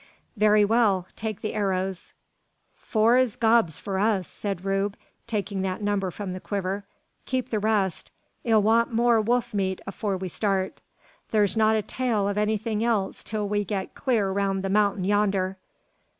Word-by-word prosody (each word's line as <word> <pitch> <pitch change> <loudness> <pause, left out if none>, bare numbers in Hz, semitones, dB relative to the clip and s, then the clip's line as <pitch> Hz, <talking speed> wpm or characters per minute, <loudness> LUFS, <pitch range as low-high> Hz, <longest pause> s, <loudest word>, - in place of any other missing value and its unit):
"Very 210 -1 +5
well! 205 -4 +2
take 215 -1 -4
the 215 - -3
arrows." 190 -3 -2 0.6
"Four's 235 +2 +2
gobs 225 -8 +3
for 195 -1 -3
us," 205 -3 +1
said 195 -3 -5
Rube, 195 +1 0 0.3
taking 200 -3 -2
that 190 +2 -3
number 205 -2 0
from 185 +1 -5
the 185 - -5
quiver. 195 0 -3 0.4
"Keep 260 -1 -2
the 215 - +1
rest. 205 -4 0 0.3
'Ee'll 220 -3 +3
want 230 +3 +3
more 235 0 +3
wolf 240 +2 0
meat 190 -2 -1
afore 195 0 -2
we 185 0 -4
start. 190 +2 -1 0.5
Thur's 210 -2 +2
not 220 0 +4
a 215 - 0
tail 240 -1 -1
o' - - +1
anythin' 215 +1 0
else 215 -5 0
till 215 -2 -3
we 205 0 0
git 195 -1 -4
clur 215 -7 0
roun' 195 -1 0
the 195 - -2
mountain 200 -1 +2
yander. 195 -1 +1
205 Hz, 160 wpm, -26 LUFS, 195-220 Hz, 0.6 s, Very